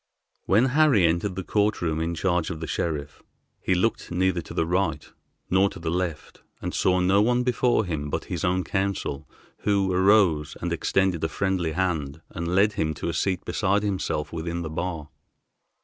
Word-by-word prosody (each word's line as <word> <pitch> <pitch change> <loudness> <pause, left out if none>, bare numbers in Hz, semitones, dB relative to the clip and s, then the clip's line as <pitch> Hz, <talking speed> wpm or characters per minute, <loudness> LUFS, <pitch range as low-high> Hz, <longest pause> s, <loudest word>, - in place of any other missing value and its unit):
When 110 +6 +4
Harry 145 - +5
entered 85 +4 0
the 95 - -4
court 105 +3 +1
room 80 -2 -1
in 85 +1 -2
charge 90 -2 0
of 80 -3 -5
the 80 - -4
sheriff, 75 -3 -3 0.4
he 95 - +1
looked 110 +6 0
neither 90 0 +1
to - - -10
the 80 - +1
right 85 -3 -1 0.4
nor 95 +2 +4
to - - -10
the 85 -3 -3
left, 85 -3 -3 0.2
and - - -4
saw 90 0 +2
no 95 +3 +4
one 120 +3 +2
before 125 -2 +2
him 75 -4 -3
but - - -2
his - - -4
own 90 +1 +1
counsel, 95 -8 -2 0.3
who 100 -2 +1
arose 90 -6 +3
and - - -2
extended 95 -4 +1
a 80 - +1
friendly 90 -3 -1
hand, 80 -4 -2
and 85 +1 -4
led 105 +2 +4
him 80 -5 -1
to 80 - -3
a - - -2
seat 95 +2 -1
beside 100 +1 +1
himself 90 -7 -2
within 85 +1 -3
the 80 - -5
bar. 80 -2 -4
90 Hz, 185 wpm, -25 LUFS, 80-100 Hz, 0.4 s, Harry